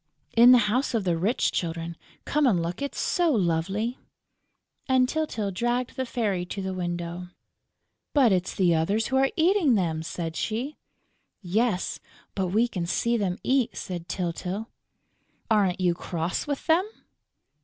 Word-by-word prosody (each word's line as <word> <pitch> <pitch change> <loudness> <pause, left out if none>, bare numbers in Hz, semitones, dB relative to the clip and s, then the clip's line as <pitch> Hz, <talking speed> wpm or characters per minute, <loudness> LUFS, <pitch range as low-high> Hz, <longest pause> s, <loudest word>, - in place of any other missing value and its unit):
"In 240 +2 +8
the 250 - +9
house 245 +4 0
of 220 - +1
the 175 -3 +1
rich 195 +9 +1
children.... 165 0 -3 0.3
Come 295 -1 +2
and 195 -8 +3
look, 170 +7 -3
it's 280 - -3
so 345 -3 +2
lovely!" 195 - 0 0.9
And 260 -1 +4
Tyltyl 250 -9 -2
dragged 240 +5 -1
the 260 -1 -2
Fairy 205 -7 -1
to 180 +3 -6
the 190 0 -3
window. 175 0 -4 0.8
"But 265 -7 +4
it's 185 -1 0
the 180 -3 +3
others 200 +8 +1
who 265 - +1
are 270 0 +4
eating 330 - +3
them!" 165 -5 0
said 165 0 -5
she. 245 - -2 0.7
"Yes, 195 +1 0 0.3
but 190 -2 -1
we 220 +7 +2
can 180 -7 -4
see 235 +6 +1
them 195 -5 -1
eat," 260 -2 +1
said 175 -2 -6
Tyltyl. 185 +4 -3 0.8
"Aren't 195 -4 +3
you 180 -2 +2
cross 170 - -3
with 285 -2 -3
them?" 345 +5 +3
200 Hz, 155 wpm, -26 LUFS, 175-250 Hz, 0.9 s, the